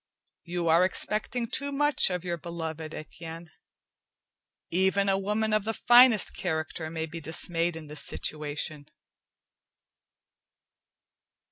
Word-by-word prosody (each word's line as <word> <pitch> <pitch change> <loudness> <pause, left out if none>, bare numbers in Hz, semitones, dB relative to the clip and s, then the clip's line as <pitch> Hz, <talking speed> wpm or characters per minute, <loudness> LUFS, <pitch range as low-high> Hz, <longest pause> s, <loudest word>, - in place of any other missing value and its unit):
"You 175 0 -2
are 165 +2 +5
expecting 215 +5 -1
too 280 +5 -3
much 295 -3 +3
of 180 -1 -3
your 175 -1 -1
beloved, 160 -2 -5
Etienne. 165 +1 -9 1.2
Even 190 +3 +2
a 195 0 +2
woman 210 +2 0
of 215 -1 +2
the 225 +1 -2
finest 240 -3 +6
character 160 -1 -3
may 160 0 -3
be 165 +1 -8
dismayed 165 +1 -1
in 160 -1 -8
this 150 0 -6
situation." 150 0 -3
170 Hz, 115 wpm, -28 LUFS, 160-210 Hz, 1.2 s, finest